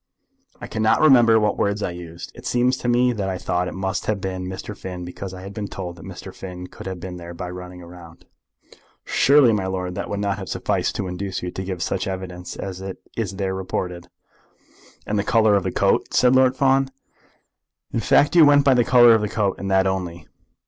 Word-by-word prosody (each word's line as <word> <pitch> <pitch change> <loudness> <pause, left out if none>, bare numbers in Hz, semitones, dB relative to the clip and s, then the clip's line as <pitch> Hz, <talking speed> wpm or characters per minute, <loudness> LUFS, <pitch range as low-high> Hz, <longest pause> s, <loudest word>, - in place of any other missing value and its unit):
"I - - -7
cannot 110 0 +1
remember 120 -7 +6
what 105 -1 0
words 100 +1 0
I - - -1
used. 85 -1 -9
It - - -9
seems 125 +1 +2
to 120 - -5
me 125 +1 +3
that 100 -4 -2
I 95 - -2
thought 90 0 -1
it - - -6
must 95 +1 -3
have 105 -2 0
been 95 -1 -4
Mr. 95 +3 -6
Finn 90 -3 -7
because 90 +2 -7
I 95 0 -9
had 100 +1 -8
been 105 -1 -4
told 90 -3 -6
that 85 - -12
Mr. - - -9
Finn 90 -1 -8
could 90 - -10
have 95 -1 -5
been 90 0 -7
there 85 0 -9
by 90 +1 -6
running 90 0 -9
round." 85 -1 -14 0.8
"Surely, 140 -4 +5
my 95 -3 -1
lord, 90 -1 -3
that - - -5
would 100 - -3
not 100 0 -1
have 95 - -7
sufficed - - -1
to 95 - -2
induce 90 +1 -4
you 90 - -3
to 95 - -5
give 95 -2 -4
such 95 +1 -2
evidence 90 -1 -6
as 95 -1 -6 0.3
is 100 -4 -3
there 95 -1 -2
reported?" 90 -2 -4 1.0
"And 105 0 -1
the - - 0
colour 110 -1 +3
of 100 - +2
the 95 0 -3
coat," - - +1
said 125 +1 +5
Lord 130 0 +4
Fawn. 135 0 +3 1.0
"In - - 0
fact 145 - +3
you 170 - +8
went 145 -1 +6
by 135 - +6
the 125 -1 +4
colour 120 -1 +7
of 110 - +3
the 105 - -2
coat, 100 -3 -1
and 100 - -4
that 95 0 +3
only?" 90 -3 -3
95 Hz, 220 wpm, -22 LUFS, 90-110 Hz, 1.0 s, you